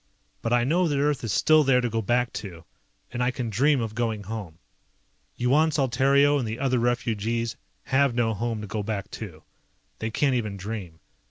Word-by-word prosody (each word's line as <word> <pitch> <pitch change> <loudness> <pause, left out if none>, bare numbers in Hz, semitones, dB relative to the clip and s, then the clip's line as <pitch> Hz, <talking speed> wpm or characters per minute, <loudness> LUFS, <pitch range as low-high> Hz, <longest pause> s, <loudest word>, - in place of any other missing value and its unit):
But 115 - -2
I 120 0 +4
know 170 +7 +2
that 145 -3 0
Earth 145 -1 +1
is 115 - -2
still 155 +8 +5
there 135 -2 +4
to 125 - 0
go 115 -1 -1
back 120 +3 0
to, 85 -5 -7 0.5
and 120 - -3
I 125 - +2
can 125 -2 -3
dream 140 +6 +3
of 110 -2 -3
going 110 -2 -2
home. 100 -6 -6 0.8
Yuan 140 +6 +3
Saltario 140 0 +3
and 120 - -2
the 110 +1 -4
other 130 -2 +1
refugees 115 -1 -1 0.3
have 135 -2 +2
no 115 -2 +1
home 115 +1 -2
to 105 - -6
go 105 +1 -3
back 105 -1 -4
to. 85 -8 -8 0.6
They 110 - -2
can't 135 +4 +1
even 110 -5 -2
dream. 95 -5 -6
120 Hz, 190 wpm, -26 LUFS, 110-135 Hz, 0.8 s, still